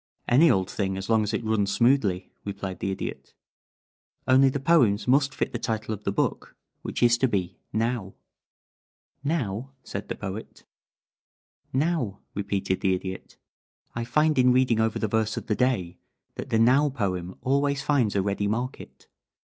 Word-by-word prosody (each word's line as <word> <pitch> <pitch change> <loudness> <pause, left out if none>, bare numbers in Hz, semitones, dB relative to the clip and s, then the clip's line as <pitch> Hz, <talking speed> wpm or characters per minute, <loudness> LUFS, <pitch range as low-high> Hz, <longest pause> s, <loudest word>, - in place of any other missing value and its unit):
"Any 150 +7 +6
old 95 -6 +2
thing 95 -2 -2
as 95 +3 -4
long 110 -1 +4
as 105 0 -1
it 110 +1 -2
runs 105 -3 +1
smoothly," 115 -6 +2
replied 100 -2 -5
the 95 - -2
Idiot. 95 - -6 0.9
"Only 135 +1 +6
the 140 - -2
poems 125 -10 +3
must 140 +2 +3
fit - - -1
the 120 - -2
title 110 -2 -2
of 105 0 -8
the - - +1
book, 100 - -2 0.3
which - - -3
is 120 0 +5
to 130 - +3
be 95 -5 -2
Now." 115 -3 -2 1.1
"Now?" 135 -5 -2
said 100 - -6
the - - -4
Poet. 105 +2 -7 1.1
"Now!" 135 - 0
repeated 100 -2 -2
the 95 -1 +2
Idiot. 95 0 -7 0.6
"I 115 - -3
find 150 +4 +2
in 125 0 +5
reading 125 -3 +3
over 110 0 +1
the 110 - -1
verse 110 0 0
of - - -4
the 110 - 0
day 95 -9 0 0.3
that - - -7
the 115 - +2
'Now' 130 +6 +4
poem 95 -8 -3
always 140 +1 +1
finds 130 -9 +1
a 100 - +2
ready 100 +1 -1
market. 120 +5 -4
110 Hz, 165 wpm, -26 LUFS, 100-130 Hz, 1.1 s, Any